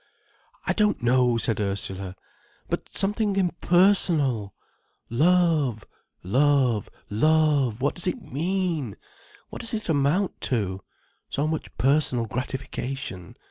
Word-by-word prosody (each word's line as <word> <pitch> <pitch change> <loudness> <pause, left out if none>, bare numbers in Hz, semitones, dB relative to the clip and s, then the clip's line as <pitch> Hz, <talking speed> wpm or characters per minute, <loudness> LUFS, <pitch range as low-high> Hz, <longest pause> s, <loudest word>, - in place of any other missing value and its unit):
"I - - +1
don't 210 - +1
know," 125 -1 +3
said 115 -1 +1
Ursula. 95 -2 -3 0.5
"But - - -3
something 205 +1 0
impersonal. 175 - +2 0.6
Love—love—love—what 140 - +1 1.1
does 175 - -2
it 180 - -1
mean—what 165 - -5
does 230 0 -2
it 215 -4 -5
amount 155 +6 +1
to? 100 -6 -1 0.5
So 145 - -1
much 160 0 -4
personal 135 -3 +2
gratification. 130 - -5
140 Hz, 90 wpm, -25 LUFS, 115-175 Hz, 1.1 s, know